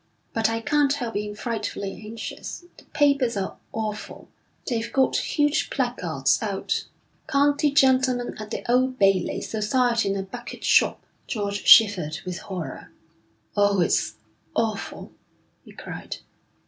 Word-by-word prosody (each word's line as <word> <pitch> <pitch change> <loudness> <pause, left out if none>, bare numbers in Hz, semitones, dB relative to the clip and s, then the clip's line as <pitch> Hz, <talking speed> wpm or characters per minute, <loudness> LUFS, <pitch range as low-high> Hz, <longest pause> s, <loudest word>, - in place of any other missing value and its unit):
'But 225 -1 +2
I 225 0 -2
can't 295 +1 +2
help 245 -6 -3
being 210 0 -3
frightfully 210 -3 -4
anxious. 225 +10 -7
The - - -17
papers 280 -6 +2
are 190 -1 -3
awful. 215 -1 -5 0.4
They've 230 -2 -2
got 265 -1 +2
huge 295 0 +1
placards - - 0
out: - - -2 0.4
County 290 0 +3
gentleman 260 -3 +3
at 215 0 -7
the - - -4
Old 255 +1 +2
Bailey. 195 -3 +2
Society 230 0 +1
in 195 - 0
a 195 - -2
Bucket 190 - -9
Shop.' - - +3 0.2
George 205 -2 -3
shivered 185 -9 +6
with 180 0 -4
horror. 185 -5 -7 0.6
'Oh, 205 -1 +3
it's 175 - +1 0.4
awful!' 220 -3 -2 0.5
he - - -15
cried. - - -7
225 Hz, 130 wpm, -25 LUFS, 205-260 Hz, 0.6 s, shivered